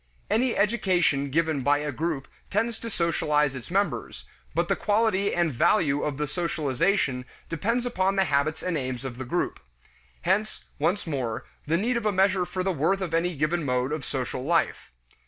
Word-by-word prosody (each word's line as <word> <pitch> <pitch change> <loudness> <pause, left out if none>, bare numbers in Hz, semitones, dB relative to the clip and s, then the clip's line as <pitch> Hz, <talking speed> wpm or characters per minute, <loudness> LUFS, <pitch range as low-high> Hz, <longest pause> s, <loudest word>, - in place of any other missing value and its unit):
Any 245 +2 +2
education 180 -10 +2
given 155 0 +1
by 145 +3 +3
a 150 0 -2
group 155 0 -2 0.2
tends 225 +3 0
to 230 - -5
socialize 150 - +1
its 130 -4 -8
members, 200 +3 -1 0.3
but - - +2
the - - +2
quality 205 -2 +2
and 170 -4 +1
value 145 - +3
of 145 -3 -2
the 150 - 0
socialization 150 -3 0 0.3
depends 230 +9 0
upon 195 -5 +1
the 195 - +4
habits 145 +1 0
and 175 -4 0
aims 130 -1 -4
of 125 -2 -6
the 130 - -4
group. 175 +9 -1 0.6
Hence, 210 +4 0
once 195 +4 +1
more, 130 -8 -3 0.2
the 165 +2 +2
need 235 +6 +1
of 225 -2 -1
a - - +3
measure 190 -1 +3
for 185 +1 -3
the 190 - +1
worth 170 +6 +1
of 175 -4 -3
any 170 +1 +1
given 155 +4 0
mode 125 0 0
of 155 -2 -2
social 130 -1 -3
life. 165 - +1
165 Hz, 180 wpm, -26 LUFS, 140-195 Hz, 0.6 s, the